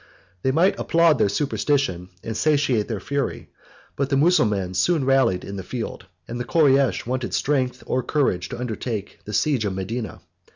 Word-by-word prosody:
They 130 Hz, -, +1 dB
might 170 Hz, +7 st, +2 dB
applaud 165 Hz, -5 st, +3 dB
their 100 Hz, -, +3 dB
superstition, 135 Hz, -, 0 dB
and 115 Hz, -, -4 dB
satiate 140 Hz, -6 st, +2 dB
their 110 Hz, -4 st, -3 dB
fury; 140 Hz, +5 st, -3 dB, 0.5 s
but 140 Hz, -1 st, -1 dB
the 140 Hz, -, +2 dB
Mussulmans 105 Hz, -, +2 dB
soon 165 Hz, -, +2 dB
rallied 135 Hz, -9 st, +3 dB
in 100 Hz, -, -6 dB
the 95 Hz, -, -5 dB
field, 115 Hz, +5 st, -6 dB, 0.2 s
and 120 Hz, +1 st, -5 dB
the -, -, -1 dB
Koreish 135 Hz, -1 st, +3 dB
wanted 125 Hz, 0 st, -2 dB
strength 130 Hz, -3 st, 0 dB
or 130 Hz, -, 0 dB
courage 130 Hz, -, 0 dB
to 125 Hz, -, -6 dB
undertake 110 Hz, -3 st, -4 dB
the 105 Hz, -, -7 dB
siege 135 Hz, -1 st, +1 dB
of 100 Hz, -3 st, -2 dB
Medina. 110 Hz, +5 st, -4 dB
125 Hz, 170 wpm, -23 LUFS, 105-140 Hz, 0.5 s, applaud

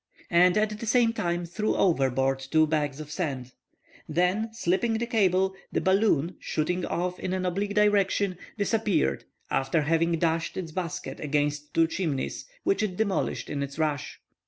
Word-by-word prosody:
and 180 Hz, +2 st, +5 dB
at 210 Hz, 0 st, 0 dB
the 230 Hz, -, -5 dB
same 235 Hz, 0 st, +4 dB
time 175 Hz, -4 st, -1 dB
threw 210 Hz, +6 st, -1 dB
overboard 135 Hz, -6 st, +2 dB
two 155 Hz, +4 st, +2 dB
bags 150 Hz, -2 st, -1 dB
of 150 Hz, -1 st, -8 dB
sand. 135 Hz, -8 st, -3 dB, 0.6 s
Then, 180 Hz, +8 st, +1 dB
slipping 225 Hz, +1 st, 0 dB
the 225 Hz, +1 st, 0 dB
cable, 190 Hz, -5 st, +2 dB, 0.2 s
the -, -, +1 dB
balloon, 190 Hz, -4 st, +2 dB
shooting 175 Hz, +4 st, -1 dB
off 180 Hz, +1 st, -2 dB
in 185 Hz, -, -3 dB
an 185 Hz, -1 st, -1 dB
oblique 200 Hz, +3 st, -1 dB
direction, 200 Hz, -3 st, +2 dB, 0.2 s
disappeared, 205 Hz, -, +1 dB, 0.3 s
after 150 Hz, +4 st, +1 dB
having 165 Hz, +2 st, +2 dB
dashed 165 Hz, 0 st, 0 dB
its 175 Hz, -4 st, -4 dB
basket 170 Hz, -1 st, -4 dB
against 150 Hz, 0 st, -1 dB
two 165 Hz, -, +5 dB
chimneys, 160 Hz, -5 st, -3 dB, 0.2 s
which 390 Hz, 0 st, +1 dB
it 195 Hz, -4 st, -2 dB
demolished 200 Hz, -3 st, -1 dB
in 145 Hz, -, -3 dB
its 140 Hz, +1 st, -5 dB
rush. 150 Hz, -4 st, -2 dB
175 Hz, 160 wpm, -27 LUFS, 150-200 Hz, 0.6 s, and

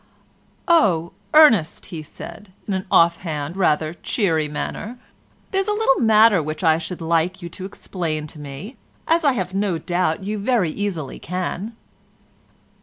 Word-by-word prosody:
"Oh, 185 Hz, -, +3 dB, 0.2 s
Ernest," 235 Hz, -, +5 dB, 0.2 s
said 205 Hz, +6 st, -10 dB, 0.2 s
he, -, -, -36 dB
in 200 Hz, -, -1 dB
an 190 Hz, 0 st, -3 dB
off 170 Hz, 0 st, +5 dB
hand, 155 Hz, -2 st, -4 dB
rather 155 Hz, -4 st, +1 dB
cheery 165 Hz, -5 st, 0 dB
manner, 210 Hz, +10 st, -5 dB, 0.5 s
"there's 390 Hz, +1 st, 0 dB
a 420 Hz, -, +1 dB
little 420 Hz, -11 st, +2 dB
matter 220 Hz, -4 st, +5 dB
which 155 Hz, +3 st, -5 dB
I 160 Hz, -1 st, +4 dB
should 175 Hz, +1 st, -6 dB
like 170 Hz, +3 st, 0 dB
you 170 Hz, -, -5 dB
to 185 Hz, +3 st, -8 dB
explain 165 Hz, -5 st, -4 dB
to 150 Hz, 0 st, -11 dB
me, 150 Hz, -, -8 dB, 0.3 s
as 330 Hz, +1 st, +3 dB
I 285 Hz, -3 st, +4 dB
have 185 Hz, -5 st, -3 dB
no 195 Hz, -3 st, 0 dB
doubt 175 Hz, +1 st, -1 dB
you 210 Hz, +2 st, -3 dB
very 205 Hz, -6 st, +1 dB
easily 175 Hz, -7 st, -4 dB
can." 185 Hz, +4 st, -4 dB
185 Hz, 155 wpm, -21 LUFS, 160-210 Hz, 0.5 s, Ernest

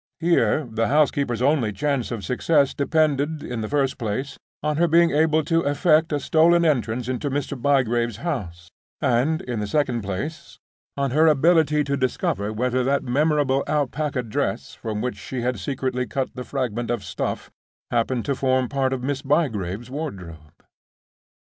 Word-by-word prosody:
Here 165 Hz, -2 st, +2 dB
the 115 Hz, 0 st, -1 dB
housekeeper's 140 Hz, -4 st, +1 dB
only 135 Hz, -6 st, +2 dB
chance 140 Hz, +1 st, -1 dB
of 110 Hz, -6 st, -5 dB
success 140 Hz, -, +2 dB
depended, 150 Hz, 0 st, 0 dB
in 120 Hz, -2 st, -4 dB
the 110 Hz, -, -4 dB
first 140 Hz, -2 st, 0 dB
place, 120 Hz, +5 st, -3 dB, 0.3 s
on 150 Hz, -1 st, 0 dB
her 170 Hz, +1 st, +3 dB
being 170 Hz, +1 st, +4 dB
able 155 Hz, +1 st, +3 dB
to 165 Hz, +2 st, +1 dB
effect 155 Hz, +2 st, +2 dB
a 145 Hz, -, 0 dB
stolen 170 Hz, +4 st, +4 dB
entrance 125 Hz, -5 st, 0 dB
into 130 Hz, +3 st, -2 dB
Mr. 140 Hz, +1 st, -2 dB
Bygrave's 120 Hz, -4 st, +1 dB
house, 90 Hz, -, -4 dB, 0.3 s
and, 140 Hz, +4 st, +1 dB
in 120 Hz, -3 st, -3 dB
the 105 Hz, -, -2 dB
second 130 Hz, -2 st, 0 dB
place, 100 Hz, -, -5 dB, 0.4 s
on 140 Hz, -2 st, 0 dB
her 155 Hz, +4 st, +4 dB
ability 155 Hz, 0 st, +4 dB
to 140 Hz, 0 st, -1 dB
discover 115 Hz, -6 st, -1 dB
whether 125 Hz, +3 st, 0 dB
that 140 Hz, +3 st, +1 dB
memorable 140 Hz, 0 st, +1 dB
alpaca 145 Hz, -2 st, -1 dB
dress 110 Hz, -, -3 dB
from 110 Hz, -2 st, -4 dB
which 125 Hz, -5 st, -3 dB
she 120 Hz, +5 st, -5 dB
had 125 Hz, -2 st, -1 dB
secretly 125 Hz, +4 st, -2 dB
cut 135 Hz, -1 st, -3 dB
the 125 Hz, -, -6 dB
fragment 120 Hz, -4 st, -3 dB
of 120 Hz, -4 st, -1 dB
stuff 85 Hz, -, -4 dB, 0.4 s
happened 120 Hz, 0 st, 0 dB
to 140 Hz, -, 0 dB
form 130 Hz, -1 st, +1 dB
part 135 Hz, -1 st, 0 dB
of 125 Hz, -1 st, -4 dB
Miss 135 Hz, 0 st, -2 dB
Bygrave's 120 Hz, -, -1 dB
wardrobe. 90 Hz, -, -7 dB
135 Hz, 160 wpm, -23 LUFS, 120-150 Hz, 0.4 s, being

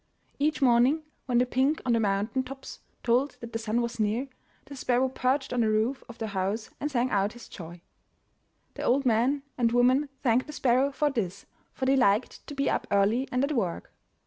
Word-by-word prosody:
Each 300 Hz, 0 st, +1 dB
morning, 255 Hz, +5 st, +4 dB, 0.2 s
when 245 Hz, -2 st, +2 dB
the 250 Hz, -, +4 dB
pink 265 Hz, +5 st, +1 dB
on 245 Hz, -, +2 dB
the 230 Hz, -, +3 dB
mountain 210 Hz, +4 st, 0 dB
tops 270 Hz, +1 st, -9 dB, 0.2 s
told 250 Hz, +3 st, +1 dB
that 235 Hz, -1 st, -9 dB
the 225 Hz, -, -2 dB
sun 225 Hz, +2 st, 0 dB
was 235 Hz, -1 st, -4 dB
near, 220 Hz, +6 st, 0 dB, 0.4 s
the 280 Hz, -, -10 dB
sparrow 255 Hz, 0 st, +1 dB
perched 265 Hz, +1 st, 0 dB
on 245 Hz, -, +1 dB
the 220 Hz, -, +2 dB
roof 220 Hz, +5 st, 0 dB
of 235 Hz, -, -10 dB
the 220 Hz, -1 st, -4 dB
house 200 Hz, +3 st, -2 dB
and 295 Hz, -, -2 dB
sang 250 Hz, -2 st, 0 dB
out 200 Hz, +1 st, +1 dB
his 240 Hz, -, -12 dB
joy. 175 Hz, 0 st, -10 dB, 0.9 s
The -, -, -7 dB
old 270 Hz, +2 st, +2 dB
man 250 Hz, +4 st, +2 dB, 0.2 s
and 230 Hz, -2 st, +3 dB
woman 255 Hz, +4 st, +3 dB
thanked 250 Hz, +1 st, +2 dB
the 300 Hz, -, -8 dB
sparrow 265 Hz, 0 st, +2 dB
for 295 Hz, +1 st, +1 dB
this, 200 Hz, -6 st, -3 dB, 0.3 s
for 260 Hz, -, -2 dB
they 270 Hz, +1 st, +4 dB
liked 220 Hz, -2 st, +1 dB
to 290 Hz, -, -7 dB
be 275 Hz, 0 st, 0 dB
up -, -, 0 dB
early 205 Hz, +6 st, +2 dB
and 250 Hz, +1 st, +1 dB
at 280 Hz, -, 0 dB
work. 205 Hz, -, -2 dB
245 Hz, 205 wpm, -28 LUFS, 220-270 Hz, 0.9 s, morning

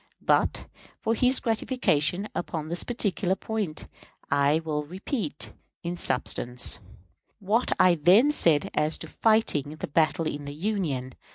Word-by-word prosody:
But, -, -, +1 dB, 0.3 s
for 225 Hz, -, 0 dB
his 250 Hz, +3 st, +3 dB
gratification 210 Hz, -, 0 dB
upon 160 Hz, -3 st, -4 dB
this 170 Hz, +1 st, +2 dB
particular 200 Hz, -5 st, 0 dB
point, 205 Hz, -7 st, -4 dB, 0.4 s
I 140 Hz, +2 st, +3 dB
will 150 Hz, -1 st, -1 dB
repeat, 180 Hz, -, -4 dB, 0.3 s
in 175 Hz, +1 st, -3 dB
substance, 125 Hz, -5 st, +1 dB, 0.6 s
what 215 Hz, +4 st, 0 dB
I 185 Hz, -, +6 dB
then 185 Hz, -, +5 dB
said 165 Hz, -, +2 dB
as 150 Hz, +1 st, +1 dB
to -, -, -8 dB
fighting 185 Hz, -10 st, +1 dB
the 155 Hz, -, -5 dB
battle 160 Hz, +2 st, +1 dB
in 145 Hz, -1 st, -4 dB
the 145 Hz, 0 st, -7 dB
Union. 155 Hz, -, -2 dB
170 Hz, 130 wpm, -26 LUFS, 150-215 Hz, 0.6 s, I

